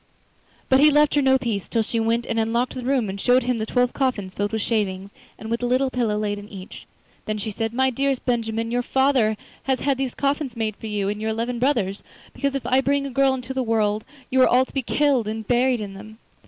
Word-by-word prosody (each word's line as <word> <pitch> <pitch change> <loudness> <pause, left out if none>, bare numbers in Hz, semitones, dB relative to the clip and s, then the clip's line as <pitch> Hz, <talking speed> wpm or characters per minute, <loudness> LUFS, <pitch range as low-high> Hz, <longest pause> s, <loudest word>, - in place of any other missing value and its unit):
But 265 - +4
he 300 +2 +7
left 295 0 +4
her 290 - +3
no 265 -1 +4
peace, 230 -6 -3
till 230 -2 +1
she 230 +2 -2
went 230 +1 +1
and 230 - -1
unlocked 235 +3 0
the 255 - -5
room 250 -3 +1
and 195 0 -5
showed 250 +1 +4
him 245 -1 -1
the 220 - -3
twelve 245 +1 +1
coffins 220 -9 -1
filled 205 +1 -2
with 220 -2 -1
shavings, 200 -3 -1 0.3
and 220 +1 -8
with 230 - 0
the 245 - -1
little 260 +2 +1
pillow 230 -5 0
laid 205 -1 -2
in 205 +1 -11
each. 190 -2 -10 0.4
Then 215 0 -2
she 215 +1 -4
said: 225 +2 -2
'My 260 +2 +2
dearest 270 +1 -1
Benjamin, 230 -2 -1
your 245 +1 +1
father 260 -4 +2 0.3
has 265 -1 0
had 275 -2 0
these 265 -2 -2
coffins 275 -3 -1
made 220 -2 -1
for 220 - -8
you 205 -2 -1
and 210 +1 -3
your 220 - -1
eleven 235 +2 -2
brothers, 230 -7 0 0.3
because 280 -1 -2
if 275 - -3
I 260 +1 +3
bring 280 +1 +1
a 275 - -5
girl 270 +1 +3
into 255 0 -6
the 265 - -1
world 215 -3 +1 0.3
you 260 0 +4
are - - +7
all 255 +1 +4
to - - -18
be 270 - 0
killed 265 -3 +1
and 220 -1 -4
buried 250 0 +2
in 200 -2 -6
them. 215 +3 -11
235 Hz, 250 wpm, -23 LUFS, 215-265 Hz, 0.4 s, he